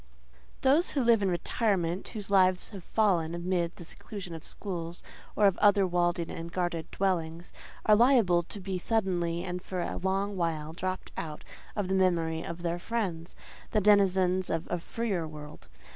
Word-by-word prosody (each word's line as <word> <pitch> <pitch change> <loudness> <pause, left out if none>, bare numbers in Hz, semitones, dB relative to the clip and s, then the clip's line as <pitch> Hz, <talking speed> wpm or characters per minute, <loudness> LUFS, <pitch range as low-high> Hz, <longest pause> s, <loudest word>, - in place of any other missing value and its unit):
Those 290 +6 +4
who 275 - 0
live 230 -2 +5
in 195 - +2
retirement, 180 -1 0
whose 205 -3 -6
lives 185 -2 +4
have 195 -4 -9
fallen 175 -7 +1
amid 175 -1 -1
the - - -10
seclusion 185 0 -8
of 165 -1 -8
schools 175 -4 -6 0.3
or 210 - +4
of 195 -2 +3
other 205 -1 +5
walled 175 -1 +1
in 170 -1 -4
and 165 0 -6
guarded 175 -3 -2
dwellings, 170 -3 -2 0.3
are 215 - +7
liable 225 -7 +5
to 180 +4 -8
be 190 -1 -3
suddenly 175 -5 0
and 180 -1 -4
for 185 0 -5
a 175 - -2
long 195 +2 -1
while 160 -3 -2
dropped 185 +2 -4
out 155 -2 -5 0.3
of 205 -3 -1
the 190 - -1
memory 170 -4 +2
of 170 +1 -6
their 170 0 -1
friends, 185 -6 -3 0.3
the 215 - +2
denizens 190 -3 +3
of 165 0 -1
a 175 - 0
freer 195 -3 -2
world. 150 - -10
180 Hz, 175 wpm, -29 LUFS, 170-200 Hz, 0.3 s, are